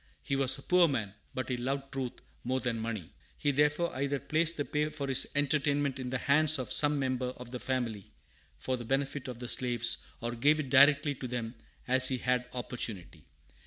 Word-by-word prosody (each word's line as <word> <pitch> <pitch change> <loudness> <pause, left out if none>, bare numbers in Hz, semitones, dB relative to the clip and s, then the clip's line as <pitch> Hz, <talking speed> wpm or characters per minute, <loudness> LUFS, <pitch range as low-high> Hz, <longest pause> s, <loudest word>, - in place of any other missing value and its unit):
He 140 - -1
was 135 0 +4
a 135 - -10
poor 180 -1 +5
man, 110 -9 -2 0.2
but 130 - -3
he 125 - -1
loved 135 +2 -3
truth 130 -2 -3 0.3
more 130 +2 0
than 120 -3 -2
money. 110 -6 -5 0.2
He 145 - +1
therefore 150 +4 +1
either 140 +1 -1
placed 165 +3 0
the 145 - -1
pay 150 0 -1
for 140 -2 -5
his 130 -1 +2
entertainment 145 -1 +1
in 125 -1 -4
the 130 - -1
hands 155 +3 +3
of 130 - -3
some 145 0 +3
member 130 -2 -1
of 125 -1 -10
the 125 - -5
family, 120 -7 -3 0.5
for 130 - -2
the 120 - -7
benefit 135 +2 -2
of 125 -2 -6
the 125 0 -6
slaves, 120 -2 +2 0.2
or 120 0 -3
gave 145 +6 +3
it 135 -4 -4
directly 145 +2 +6
to 130 -1 -6
them, 120 -2 -4 0.3
as 130 +1 +5
he 130 - 0
had 125 0 0
opportunity. 105 -9 -5
130 Hz, 200 wpm, -31 LUFS, 125-145 Hz, 0.5 s, directly